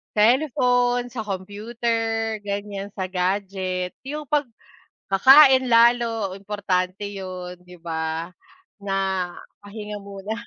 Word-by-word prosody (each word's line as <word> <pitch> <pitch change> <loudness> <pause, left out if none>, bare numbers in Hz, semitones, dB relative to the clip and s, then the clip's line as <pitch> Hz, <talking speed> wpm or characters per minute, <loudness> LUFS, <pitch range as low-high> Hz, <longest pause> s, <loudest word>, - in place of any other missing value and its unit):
cellphone, 245 0 +2
sa 245 - -6
computer, 225 +2 -2
gan'yan 200 0 -5
sa 185 -2 -4
gadget, 185 -1 -2 0.2
yung 300 +1 -4
'pag 290 0 0 0.7
kakain 260 +4 +7
lalo 230 -3 +3
importante 195 -1 -2
yun, 185 -3 -7
'di 180 0 -15
ba, 165 +1 -4 0.5
na 195 -1 -2 0.6
pahinga 210 0 -8
muna. 200 +1 -7
205 Hz, 95 wpm, -23 LUFS, 185-235 Hz, 0.7 s, kakain